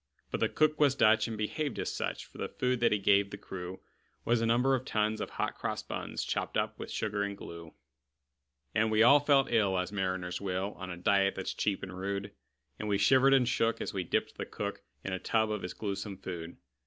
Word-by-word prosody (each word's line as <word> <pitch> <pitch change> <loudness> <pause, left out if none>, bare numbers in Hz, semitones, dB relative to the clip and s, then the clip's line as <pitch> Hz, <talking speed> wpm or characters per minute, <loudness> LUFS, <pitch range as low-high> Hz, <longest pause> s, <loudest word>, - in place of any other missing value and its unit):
But - - -1
the - - +2
cook 155 0 +2
was 145 -3 +4
Dutch, 110 -4 +4
and 115 -1 -4
behaved 130 +6 -2
as - - -2
such; - - -3
For - - -15
the - - -3
food 125 -1 0
that 120 - +3
he 105 - +3
gave 100 0 +3
the 100 - -7
crew 95 -2 -7 0.4
Was 120 0 +2
a 115 - +1
number 125 +4 +3
of 130 -1 0
tons 110 -2 0
of - - -3
hot - - -2
cross - - -3
buns, - - -4
Chopped - - -2
up - - -1
with - - -6
sugar 105 -1 -2
and 100 0 -2
glue. 85 -3 -10 1.0
And 110 0 +2
we 110 +1 +4
all 140 +5 +8
felt 140 -2 +3
ill 100 -5 +3
as 90 +1 -1
mariners 95 -2 -2
will, 95 +1 -2
On 90 -1 -6
a 90 - -5
diet 100 +2 +2
that's 95 - -3
cheap 100 -2 -1
and 90 -1 -6
rude; 100 +1 -3 0.5
And 105 - -3
we 100 -1 +2
shivered 130 +7 +5
and 125 -3 +3
shook 115 -2 +1
as - - -4
we 95 -2 -1
dipped 85 - -1
the - - -2
cook - - -4 0.2
In 95 - -3
a 95 - -2
tub 110 +2 +1
of 105 -2 -2
his 90 - -6
gluesome 100 -1 -4
food. 85 -3 -7
105 Hz, 230 wpm, -31 LUFS, 95-115 Hz, 1.0 s, all